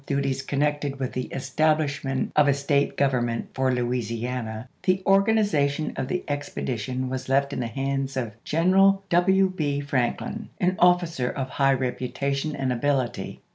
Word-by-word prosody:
duties 140 Hz, -1 st, 0 dB
connected 145 Hz, 0 st, -1 dB
with 130 Hz, -2 st, -3 dB
the 130 Hz, -, -2 dB
establishment 140 Hz, -1 st, 0 dB
of 150 Hz, -1 st, +5 dB
a 140 Hz, -, +5 dB
State 140 Hz, 0 st, 0 dB
government 120 Hz, -4 st, 0 dB
for 130 Hz, 0 st, +1 dB
Louisiana, 120 Hz, -1 st, -2 dB
the 185 Hz, +1 st, +1 dB
organization 195 Hz, -8 st, +2 dB
of 130 Hz, -, -3 dB
the 180 Hz, +5 st, -2 dB
expedition 130 Hz, -3 st, -3 dB
was 130 Hz, 0 st, -4 dB
left 140 Hz, +1 st, +2 dB
in -, -, -3 dB
the 120 Hz, -, -1 dB
hands 135 Hz, +2 st, -2 dB
of 120 Hz, -4 st, -2 dB
Greneral 195 Hz, +4 st, +3 dB
W. 190 Hz, +2 st, +4 dB
B. 145 Hz, -4 st, -1 dB
Franklin, 140 Hz, -, -2 dB
an 185 Hz, -1 st, +2 dB
officer 175 Hz, -7 st, +3 dB
of 130 Hz, -2 st, -4 dB
high 135 Hz, -1 st, +3 dB
reputation 135 Hz, +3 st, -2 dB
and 130 Hz, -2 st, -1 dB
ability. 130 Hz, 0 st, -1 dB
140 Hz, 145 wpm, -25 LUFS, 130-155 Hz, -, of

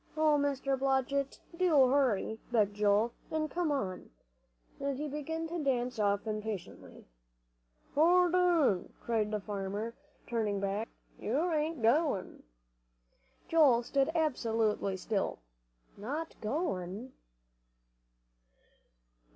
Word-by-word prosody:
"Oh, 310 Hz, -1 st, +4 dB
Mr. 275 Hz, -2 st, 0 dB
Blodgett, 270 Hz, +1 st, 0 dB, 0.2 s
do 325 Hz, -7 st, +5 dB
hurry," 240 Hz, -5 st, +1 dB
begged 210 Hz, -4 st, +2 dB
Joel, 210 Hz, +2 st, +2 dB, 0.2 s
"and 310 Hz, -1 st, -2 dB
come." 340 Hz, -3 st, 0 dB, 1.1 s
And 280 Hz, -1 st, -2 dB
he 300 Hz, +2 st, -3 dB
began 320 Hz, +3 st, -4 dB
to 335 Hz, -2 st, -3 dB
dance 250 Hz, -3 st, 0 dB
off 205 Hz, 0 st, +1 dB
impatiently. 215 Hz, -3 st, -6 dB, 0.9 s
"Hold 350 Hz, +3 st, +4 dB
on!" 340 Hz, -, +3 dB
cried 220 Hz, -3 st, 0 dB
the 215 Hz, 0 st, -1 dB
farmer, 205 Hz, +2 st, -4 dB, 0.3 s
turning 215 Hz, -4 st, -1 dB
back, 200 Hz, +3 st, -2 dB, 0.3 s
"you 310 Hz, +10 st, 0 dB
ain't 305 Hz, -4 st, -1 dB
goin'." 245 Hz, -, +1 dB, 1.1 s
Joel 280 Hz, -8 st, +5 dB
stood 270 Hz, +3 st, +1 dB
absolutely 225 Hz, -, 0 dB
still. 200 Hz, +1 st, -1 dB, 0.6 s
"Not 290 Hz, +10 st, -4 dB
going!" 215 Hz, -, -3 dB
255 Hz, 100 wpm, -32 LUFS, 215-305 Hz, 1.1 s, do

